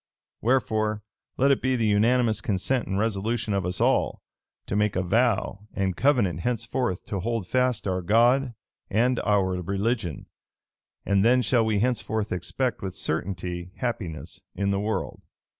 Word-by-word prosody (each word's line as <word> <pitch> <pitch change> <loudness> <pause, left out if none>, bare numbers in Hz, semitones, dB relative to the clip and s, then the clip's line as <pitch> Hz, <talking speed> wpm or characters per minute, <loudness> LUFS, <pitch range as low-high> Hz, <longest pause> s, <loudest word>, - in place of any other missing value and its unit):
Wherefore, 110 -4 +1 0.3
let 140 +2 +4
it 135 - +2
be 130 0 +1
the 115 -3 0
unanimous 110 +2 +3
consent 110 +5 -1
and 95 - -1
resolution 110 +1 -1
of 95 -2 0
us 90 0 -1
all, - - +1 0.4
to - - -3
make 105 0 +1
a 90 - +1
vow 105 0 0
and 95 -2 0
covenant 120 - +2
henceforth 120 -1 -2
to 100 - -3
hold 115 -1 -2
fast 125 -2 +1
our 95 -1 0
God 120 +6 +3 0.3
and 120 +4 +2
our 95 -3 +1
religion; 100 - -2 0.8
and 100 0 +3
then 125 +2 +4
shall 115 +1 +3
we 105 -2 +1
henceforth 110 -3 -1
expect 115 +7 -2
with 95 -2 -5
certainty 90 -1 -3
happiness 100 -11 -4
in 100 +1 0
this 100 - 0
world." 105 -1 -3
105 Hz, 150 wpm, -26 LUFS, 95-120 Hz, 0.8 s, let